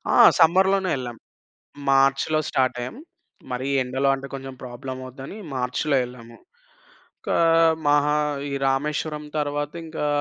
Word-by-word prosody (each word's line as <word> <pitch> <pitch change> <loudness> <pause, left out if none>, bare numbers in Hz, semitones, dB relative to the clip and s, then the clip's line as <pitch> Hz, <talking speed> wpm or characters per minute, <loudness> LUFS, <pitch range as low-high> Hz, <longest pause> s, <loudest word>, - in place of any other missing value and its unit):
ఆ! - - +4 0.2
సమ్మర్‌లోనే 190 +3 +4
ఎళ్ళాం. 120 -3 -6 0.7
మార్చ్‌లో 135 +3 +3
స్టార్ట్ 130 -2 +1
అయ్యాం. 125 - -6 0.5
మరీ 125 +2 -3 0.2
ఎండలో 130 +2 0
అంటే 135 0 -8
కొంచెం 135 -1 -6
ప్రాబ్లమ్ 130 +1 -7
అవుద్దని 135 - -9 0.2
మార్చ్‌లో 130 +3 0
ఎళ్ళాము. 120 -1 -12 0.8
ఇంకా - - -1 0.5
మహా 145 0 +3 0.4
ఈ - - -3
రామేశ్వరం 150 +2 -1
తరువాత 145 0 -2
ఇంకా 155 -2 -3
135 Hz, 120 wpm, -24 LUFS, 130-150 Hz, 0.8 s, ఆ